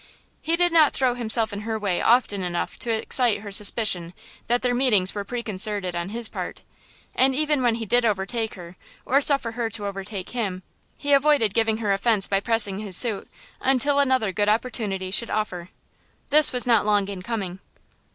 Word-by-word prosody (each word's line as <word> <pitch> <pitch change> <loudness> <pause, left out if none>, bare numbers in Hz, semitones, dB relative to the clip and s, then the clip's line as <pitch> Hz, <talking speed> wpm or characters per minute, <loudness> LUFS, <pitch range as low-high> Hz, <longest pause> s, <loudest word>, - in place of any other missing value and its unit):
He 330 - 0
did 350 0 +1
not 315 -3 +4
throw 255 -2 +1
himself 225 -2 0
in 200 - -6
her 220 +1 -4
way 200 -4 -2
often 230 -4 +2
enough 175 -1 -4
to 240 - -4
excite 225 0 0
her 205 -1 -9
suspicion 200 -4 +2 0.3
that 245 +1 0
their 250 -1 +1
meetings 225 -7 +2
were 205 - -4
preconcerted 205 -4 -1
on 175 +2 -4
his 230 +2 -3
part, - - -7 0.5
and 265 0 +2
even 300 -1 0
when 240 -2 +1
he 230 -1 -5
did 240 +4 +1
overtake 220 +1 -2
her 175 -1 -12 0.3
or 275 +2 +2
suffer 275 -5 +2
her 230 0 -3
to 210 -2 -7
overtake 195 -1 -6
him, 195 -7 -4 0.3
he 285 0 0
avoided 280 -7 +3
giving 225 -1 +1
her 210 -3 -1
offense 200 0 +1
by 195 - 0
pressing 205 -2 +2
his 200 -4 -1
suit 225 -5 +5 0.3
until 270 +2 +1
another 260 -7 +1
good 205 +3 0
opportunity 210 -5 -2
should 235 +4 0
offer. 185 -5 -4 0.6
This 305 +1 +6
was 250 -2 -1
not 230 -4 +3
long 205 -1 +1
in 195 -2 -7
coming. 190 -3 -5
220 Hz, 185 wpm, -23 LUFS, 195-245 Hz, 0.6 s, This